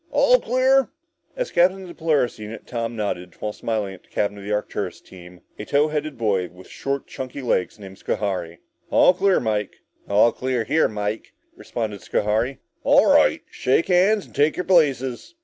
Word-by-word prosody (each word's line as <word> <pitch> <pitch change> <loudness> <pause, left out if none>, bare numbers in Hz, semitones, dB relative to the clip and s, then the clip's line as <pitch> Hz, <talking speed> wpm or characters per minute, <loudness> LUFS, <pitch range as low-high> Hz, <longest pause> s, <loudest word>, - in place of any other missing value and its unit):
All - - +4
clear?" 260 +1 +3 0.5
As - - -3
captain 185 +2 +3
of - - -10
the 175 - -9
Polaris 150 -9 0
unit, 110 +1 -8
Tom 115 -1 -4
nodded, 90 -5 -4
while 105 - -3
smiling 105 -4 -3
at 95 - -13
the - - -30
captain 100 0 -2
of - - -10
the 105 - -5
Arcturus 105 0 -3
team, 90 -1 -14 0.2
a 105 - -5
tow 145 +5 +2
headed 150 -2 -3
boy 100 -6 0
with 90 +2 -16
short 140 0 -4
chunky 130 +1 -7
legs 95 -6 0
named 95 -2 -12
Schohari. 90 -5 -3 0.3
"All - - +5
clear, 190 +1 +2
Mike," 105 -3 -2 0.3
said - - -35
Tom. 100 - -1
"All 115 +2 +6
clear 130 -2 -2
here, 155 +9 +2
Mike," 105 0 -4 0.2
responded 105 -4 -5
Schohari. 110 +9 0 0.3
"All - - +5
right, - - +4
shake 135 +8 +1
hands 190 +3 +3
and - - -20
take 145 +2 +2
your 180 - -2
places." 140 - +1
120 Hz, 185 wpm, -22 LUFS, 105-160 Hz, 0.5 s, All